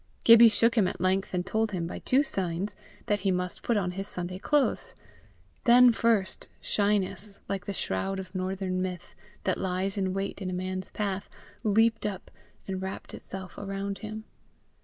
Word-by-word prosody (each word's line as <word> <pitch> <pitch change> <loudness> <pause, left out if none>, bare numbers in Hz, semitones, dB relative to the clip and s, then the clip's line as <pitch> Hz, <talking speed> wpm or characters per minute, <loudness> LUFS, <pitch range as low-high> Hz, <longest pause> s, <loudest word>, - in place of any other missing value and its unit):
Gibbie 230 0 +9
shook 230 +1 +4
him 215 -6 +3
at 185 - -4
length, 185 +2 +1
and 180 -1 -1
told 220 +2 0
him, 175 -3 -1
by 170 - -5
two 270 +3 +3
signs, 190 - -2 0.3
that 205 0 +1
he 195 0 0
must 180 -1 -1
put 235 - +1
on 180 -3 0
his 195 +2 -4
Sunday 180 -1 -3
clothes. 295 +5 +1 0.7
Then 245 0 +8
first 225 -4 +1
shyness, 205 0 0
like 195 -2 -4
the - - -1
shroud 190 - -2
of 185 0 -7
northern 185 0 -2
myth 180 -2 -5 0.3
that 185 - 0
lies 190 +2 -1
in 190 -1 0
wait 195 +1 -3
in 185 - -2
a - - -3
man's 185 +1 -3
path, 200 -2 -3 0.3
leaped 225 +1 +3
up, 195 -3 -6 0.4
and 190 -1 -3
wrapped 190 0 -6
itself 190 -2 -8
around 195 0 -4
him. 215 0 -6
195 Hz, 175 wpm, -28 LUFS, 185-210 Hz, 0.7 s, Gibbie